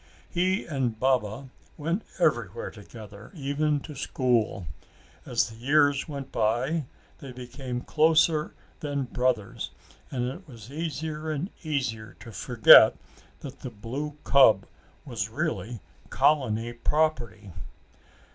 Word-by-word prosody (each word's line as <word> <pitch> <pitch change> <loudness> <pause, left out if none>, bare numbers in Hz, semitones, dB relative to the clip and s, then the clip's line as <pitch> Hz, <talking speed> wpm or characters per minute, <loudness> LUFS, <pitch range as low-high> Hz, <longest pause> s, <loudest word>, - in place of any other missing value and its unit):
He 185 +3 0
and 130 -8 -2
Baba 130 0 0 0.3
went 165 +7 -2
everywhere 480 +2 0
together, - - -12
even 145 0 0
to 150 - -9
school. 125 -8 0 0.6
As - - +1
the - - -11
years 145 +2 +3
went 140 -2 -6
by 125 +8 0 0.3
they 135 - -9
became 125 0 -6
closer 155 +1 +3 0.2
than 145 -2 -2
brothers 125 -5 -1 0.4
and 125 -2 -2
it 175 +9 -7
was 120 -2 -12
easier 155 0 -4
and 155 +6 -3
easier 125 -9 -3
to 115 - -10
forget 110 +3 +7 0.4
that 135 -1 -9
the 130 - -6
blue 130 +7 -6
cub 115 -8 +5 0.4
was 115 -6 -3
really 125 - -3 0.3
colony 120 -6 +2
property. 120 -7 -1
135 Hz, 115 wpm, -27 LUFS, 120-150 Hz, 0.6 s, forget